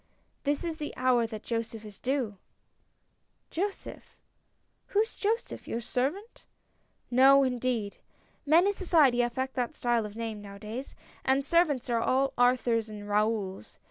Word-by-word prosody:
" - - -43
This 290 +2 0
is 330 -2 -3
the 295 - -5
hour 250 -2 +3
that 215 -2 -8
Joseph 230 -1 -4
is 210 -2 -11
due 250 -6 -1 0.4
" - - -45
" - - -46
Joseph? 390 +4 -5 0.7
Who 410 - +2
is 445 - -3
Joseph? 445 +3 -2
Your 230 - -2
servant? 275 - -3 0.3
" - - -42 0.3
"No, 270 +3 +7
indeed. 245 -5 -1 0.4
Men 320 +5 +5
in 405 - +2
society 310 -10 +4
affect 260 +2 -2
that 245 -1 -1
style 240 -3 0
of 210 - -12
name, 225 -2 -4
now 200 -1 -10
a - - -12
days 225 +6 -7
— - - -26
and 265 +1 +2
servants 295 -6 +2
are 235 -2 +1
all 270 +3 +1
Arthurs 245 -2 +2
and 210 -1 -8
Raouls. 210 - -1
250 Hz, 170 wpm, -29 LUFS, 225-285 Hz, 0.7 s, No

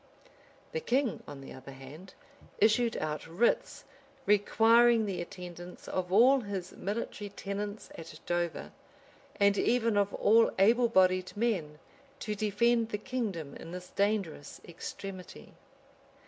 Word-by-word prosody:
The 475 - -2
king, 260 - 0
on 140 -1 -9
the 135 - -10
other 130 +1 -11
hand, 145 +8 -12 0.4
issued 225 +2 +3
out 155 0 -3
writs, 185 +9 0 0.4
requiring 225 +2 +4
the 185 -4 -3
attendance 175 0 -9
of 180 -1 -3
all 250 +7 +6
his 200 -6 -5
military 205 0 -4
tenants 205 +1 -6
at 165 0 -10
Dover, 175 -2 -2 0.7
and 200 0 +4
even 230 -3 +2
of 200 0 +2
all 225 +2 +5
able 230 +5 +4
bodied 185 -2 +2
men, 185 -10 -1 0.4
to 210 - -2
defend 220 +3 +1
the 210 - -2
kingdom 205 - -4
in 165 - -10
this 180 0 -8
dangerous 200 -7 -1
extremity. 185 +2 -9
200 Hz, 125 wpm, -30 LUFS, 175-225 Hz, 0.7 s, all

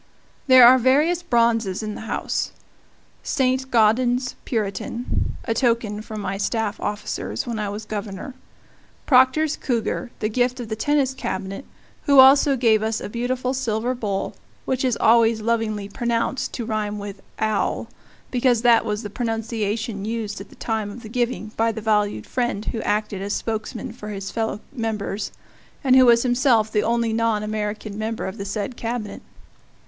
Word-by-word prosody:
There 255 -2 +9
are 255 +2 +8
various 295 +8 +3
bronzes 230 - +1
in 215 -1 -3
the - - -7
house: - - -2 0.7
Saint 260 -1 0
Gaudens's 245 +2 +3
"Puritan," 220 +2 -2
a 225 - -1
token 230 -3 0
from 215 -1 -7
my 195 0 -3
staff 220 +1 -1
officers 210 0 -3
when 235 -3 -3
I 210 -1 -2
was 210 +2 -6
Governor; 205 +3 -5 0.7
Proctor's 265 +4 +4
cougar, 240 -1 -2
the 215 - -1
gift 245 +3 0
of 235 -3 -6
the 220 - -2
Tennis 275 +2 +1
Cabinet 195 -1 -5 0.4
who 280 -2 +4
also 275 +1 +7
gave 225 -3 +3
us 220 0 -1
a - - -6
beautiful 250 +3 -2
silver 240 -1 -1
bowl, 205 -5 -3 0.3
which 260 0 -1
is 255 -3 +1
always 225 0 +4
lovingly 215 -2 -1
pronounced 235 +3 -1
to 235 - -4
rhyme 215 -2 -2
with 200 -1 -7 0.2
"owl" 215 -1 0 0.4
because 245 -2 +2
that 235 -2 +5
was 210 -1 -3
the 205 - -5
pronunciation 225 -2 -2
used 215 -2 -3
at 195 - -11
the - - -16
time 220 -2 -2
of 230 +4 -9
the 215 - -8
giving 240 -2 -1
by 225 0 +2
the 220 - -6
valued 210 -1 0
friend 240 -4 -2
who 225 - -3
acted 210 -2 -1
as 200 +1 -2
spokesman 220 0 -4
for 210 -3 -8
his 195 -2 -5
fellow 220 -2 -2
members, 215 -4 -3 0.5
and 260 -2 +5
who 260 -1 +7
was 235 0 +6
himself 245 -3 +3
the 210 - +2
only 230 0 0
non 225 -2 +1
American 210 0 -4
member 220 +1 -3
of 190 - -6
the 200 - -4
said 205 +4 -3
Cabinet. 230 -2 -4
225 Hz, 165 wpm, -23 LUFS, 210-245 Hz, 0.7 s, There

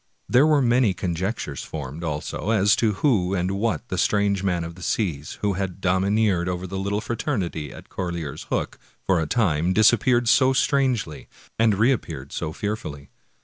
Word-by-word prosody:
There 130 +5 +5
were 150 -3 +4
many 120 -5 +3
conjectures 90 - -3
formed, 75 +2 -7
also, 75 +5 -3
as 105 -2 +4
to 110 -3 +2
who 100 -9 +2
and 90 +1 0
what 105 +3 -1
was 120 - -38
the 95 - -2
strange 100 -2 +2
man 90 -3 0
of 85 0 -6
the 90 - -14
seas, 80 -7 -2
who 105 -1 +1
had 95 -1 -4
domi 95 +1 +1
neered 100 -5 +2
over 90 0 -3
the 95 +1 -4
little 100 +2 -1
fraternity 100 - -3
at - - -12
Corlear's 85 -5 -5
Hook - - -2 0.3
for 95 -3 +2
a 80 - -2
time, 90 -5 +1
disappeared 120 +3 +4
so 130 +3 +5
strangely, 130 - 0 0.3
and 110 -2 +4
reappeared 95 - 0
so 80 -2 -3
fearfully. 80 -8 -5
95 Hz, 175 wpm, -24 LUFS, 85-110 Hz, 0.3 s, There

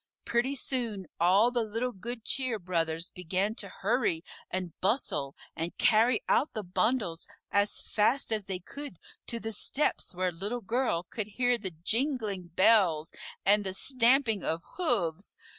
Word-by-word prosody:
Pretty 245 +4 +1
soon 235 -7 -2
all 195 +8 +5
the 245 -1 +1
little 230 +3 -2
Good 230 +2 -6
Cheer 255 -4 +1
Brothers 165 -2 -2
began 185 +3 -1
to 200 -3 -5
hurry 205 -5 0 0.3
and 185 -3 -3
bustle 185 - 0 0.2
and 165 +2 -4
carry 225 +1 +4
out 295 - +2
the 215 - -3
bundles 180 -2 0 0.2
as 205 0 +2
fast 230 +5 +1
as 215 -3 0
they 190 -1 -3
could 280 - -8 0.3
to 235 - -2
the 225 0 -4
steps 225 -1 -1
where 185 0 0
Little 205 +8 -4
Girl 225 -5 0
could 210 +3 -4
hear 245 +3 +1
the 200 -5 -4
jingling 210 - -1
bells 185 -7 +4 0.3
and 205 +2 +5
the 190 -1 -3
stamping 245 -2 +3
of 165 +1 -1
hoofs. 200 - 0
210 Hz, 150 wpm, -30 LUFS, 180-240 Hz, 0.3 s, all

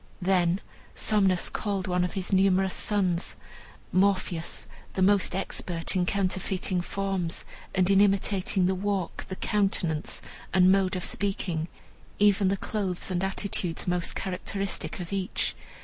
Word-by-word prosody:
Then 180 0 +2 0.3
Somnus 195 -4 +3
called 200 -3 -2
one 180 0 +1
of 180 - -2
his 190 -1 -2
numerous 190 0 +3
sons, 185 -4 +1 0.6
Morpheus, 185 -3 +1 0.3
the 190 - +1
most 195 -2 +3
expert 180 -2 -2
in 180 -1 +1
counterfeiting 190 -1 0
forms, 190 -2 -2 0.3
and 185 -1 +3
in 195 0 +5
imitating 195 -1 +2
the 190 - +2
walk, 195 -1 -2
the 190 - -5
countenance, 185 -7 0 0.4
and 185 0 +6
mode 190 -1 +2
of 180 - -2
speaking, 180 -5 -1 0.5
even 205 -1 +4
the 195 +1 +1
clothes 190 -3 -3
and 180 0 0
attitudes 190 -3 -1
most 180 -1 -1
characteristic 195 +2 -3
of 180 +2 -5
each. 190 -2 -1
190 Hz, 135 wpm, -27 LUFS, 180-195 Hz, 0.6 s, and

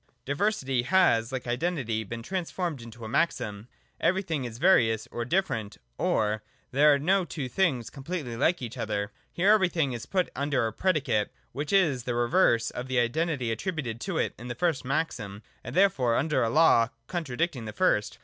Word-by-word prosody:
Diversity 140 - 0
has, 120 -7 +3
like 130 -2 -4
Identity, 120 -3 -1
been 115 +3 -7
transformed 175 -3 -3
into 115 0 -10
a - - -5
maxim: 110 -6 -1 0.3
'Everything 165 -7 0
is 115 -2 -7
various 115 - +3
or 120 - -3
different': 125 - -1 0.2
or, 105 0 +1 0.3
'There 145 +2 +5
are - - +1
no 185 +7 +2
two 150 -5 -5
things 130 -4 0
completely 140 -3 -5
like 140 +4 +1
each 120 +2 -6
other.' 105 -2 -2 0.2
Here 190 +4 +3
Everything 175 -10 +2
is 120 - -6
put 185 -2 0
under 140 -4 0
a 110 - -2
predicate, 135 - 0 0.2
which 145 +1 -4
is 155 -11 +3
the 125 - -1
re 120 0 +1
verse 120 -9 +3
of 125 - -6
the 130 0 -1
identity 125 +1 0
attributed 120 - -3
to 185 -4 -3
it - - 0
in 120 - -8
the 120 - -4
first 170 -6 0
maxim; 125 -8 -3 0.2
and 120 - -7
therefore 145 -12 +3
under 150 +5 +1
a 115 - +2
law 145 -6 +5 0.2
contradicting 155 -5 -2
the 105 - -5
first. 105 0 +1
130 Hz, 180 wpm, -28 LUFS, 115-170 Hz, 0.3 s, There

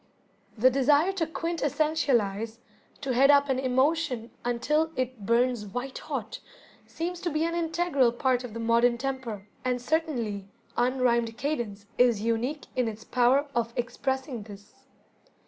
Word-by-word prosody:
The 255 +4 +5
desire 290 +7 +4
to 360 -5 -1
"quintessentialize", 290 - 0 0.4
to 270 -2 -1
head 270 +3 +5
up 285 -1 +5
an 260 -1 +1
emotion 260 -2 +1
until 300 +7 +1
it 255 -5 -3
burns 240 -1 +2
white 245 +6 -5
hot, - - -5 0.5
seems 345 +1 -4
to 350 - -1
be 310 0 0
an 335 - -1
integral 330 -6 +2
part 250 +1 +1
of 235 -3 -8
the - - -4
modern 235 +1 +3
temper, 240 -6 -4 0.2
and 250 -1 0
certainly 245 - -1 0.3
"unrhymed 240 -2 +1
cadence" 235 -9 -3
is 245 -4 +5
unique 235 +6 -1
in 250 -2 +1
its 220 0 -6
power 250 +4 +3
of 235 -1 -1
expressing 265 +1 -2
this. 205 -1 -12
255 Hz, 140 wpm, -28 LUFS, 235-290 Hz, 0.5 s, The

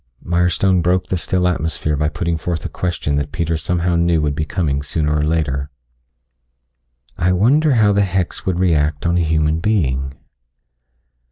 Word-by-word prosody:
Mirestone 90 +2 +2
broke 90 +2 +1
the - - 0
still 90 +1 0
atmosphere 80 -3 -1
by 75 +1 0
putting 85 +2 -2
forth 80 -1 -4
a - - -3
question 85 -5 -2
that 70 0 -2
Peter 85 -1 -1
somehow 85 +2 -1
knew 85 -1 +2
would 75 -1 0
be 75 +2 -2
coming 75 -5 -1
sooner 75 +1 -1
or 75 - +1
later. 75 -3 -1 1.5
"I 90 +2 +2
wonder 135 - +3
how 105 -3 +4
the 100 - +2
hex 95 -2 -1
would 95 -2 -1
react 80 -5 +1
on 85 0 +2
a - - +2
human 80 0 +1
being?" 70 -10 0
85 Hz, 165 wpm, -18 LUFS, 75-90 Hz, 1.5 s, how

